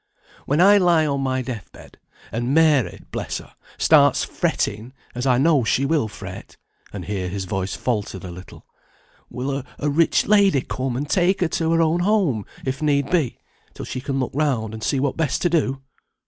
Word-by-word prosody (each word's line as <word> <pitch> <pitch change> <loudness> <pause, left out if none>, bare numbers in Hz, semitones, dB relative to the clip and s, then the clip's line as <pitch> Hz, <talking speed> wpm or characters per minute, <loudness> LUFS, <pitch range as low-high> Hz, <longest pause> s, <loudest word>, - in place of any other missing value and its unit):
When 145 +3 +1
I 200 +3 +7
lie 170 -4 +3
on 140 -2 -1
my 130 -1 -1
death 120 -7 -7
bed, - - -16 0.3
and 120 +5 -1
Mary 155 -6 +3
(bless - - -3
her) - - -12 0.2
stands - - +4
fretting, 110 +5 -2 0.2
as 125 +2 -3
I 125 -1 +4
know 145 -1 +3
she 130 +4 +1
will 145 -5 +1
fret," - - -10 0.3
and 95 -3 -7
here 95 -3 -3
his 95 +1 -4
voice 95 +1 -3
faltered 105 -6 -3
a 90 - -7
little, 90 +2 -12 0.6
"will 135 +2 -3 0.2
a 150 - -1
rich 165 +3 +3
lady 200 -9 +4
come 130 -1 -3
and 145 +3 -3
take 185 +4 +2
her 175 - +3
to 165 0 0
her 165 0 +4
own 165 +2 +1
home 180 - +1 0.2
if 130 +2 -3
need 140 -2 +1
be, 160 -9 +1 0.4
till - - -7
she 130 - -5
can 135 0 -2
look 130 - -2
round, 130 -7 0
and 110 - -7
see 130 +5 0
what 140 0 -1
best 160 -4 0
to 175 - +2
do? 135 -5 0
135 Hz, 190 wpm, -22 LUFS, 120-160 Hz, 0.6 s, I